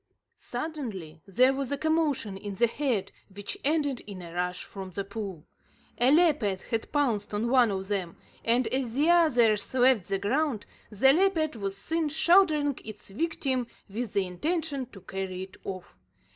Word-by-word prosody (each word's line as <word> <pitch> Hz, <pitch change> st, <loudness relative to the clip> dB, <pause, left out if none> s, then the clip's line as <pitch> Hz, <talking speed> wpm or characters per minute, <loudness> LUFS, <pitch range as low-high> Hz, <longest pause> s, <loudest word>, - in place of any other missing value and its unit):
Suddenly 205 Hz, -, -5 dB
there 255 Hz, +7 st, +4 dB
was 270 Hz, -1 st, -3 dB
a 285 Hz, -, +1 dB
commotion 305 Hz, -10 st, 0 dB
in 200 Hz, 0 st, -6 dB
the 235 Hz, -, +4 dB
herd, 240 Hz, -4 st, -1 dB, 0.2 s
which 200 Hz, +1 st, -6 dB
ended 285 Hz, -3 st, +1 dB
in 200 Hz, -3 st, -7 dB
a 170 Hz, -1 st, -9 dB
rush 180 Hz, +1 st, -2 dB
from 195 Hz, -2 st, -8 dB
the 200 Hz, +2 st, -4 dB
pool. 195 Hz, -5 st, -6 dB, 0.5 s
A 245 Hz, +2 st, +5 dB
leopard 285 Hz, -, +3 dB
had 225 Hz, -1 st, -3 dB
pounced 230 Hz, -9 st, 0 dB
on 230 Hz, +3 st, 0 dB
one 250 Hz, -3 st, +5 dB
of 190 Hz, -1 st, -3 dB
them, 190 Hz, -4 st, -3 dB, 0.3 s
and, 240 Hz, +2 st, +2 dB
as 255 Hz, -3 st, -2 dB
the 300 Hz, +5 st, +4 dB
others 240 Hz, -12 st, +4 dB
left 250 Hz, -7 st, +4 dB
the 195 Hz, -, +1 dB
ground, 235 Hz, +3 st, 0 dB, 0.2 s
the 265 Hz, +6 st, +5 dB
leopard 330 Hz, -4 st, +2 dB
was 200 Hz, -2 st, -3 dB
seen 320 Hz, +8 st, -1 dB
shouldering 310 Hz, -3 st, +3 dB
its 210 Hz, -2 st, -10 dB
victim 260 Hz, -1 st, -1 dB, 0.2 s
with 220 Hz, +2 st, -4 dB
the 200 Hz, -1 st, +2 dB
intention 285 Hz, -, -2 dB
to 205 Hz, -6 st, -14 dB
carry 190 Hz, 0 st, -4 dB
it 190 Hz, 0 st, -12 dB
off. 185 Hz, -2 st, -7 dB
235 Hz, 165 wpm, -28 LUFS, 195-290 Hz, 0.5 s, A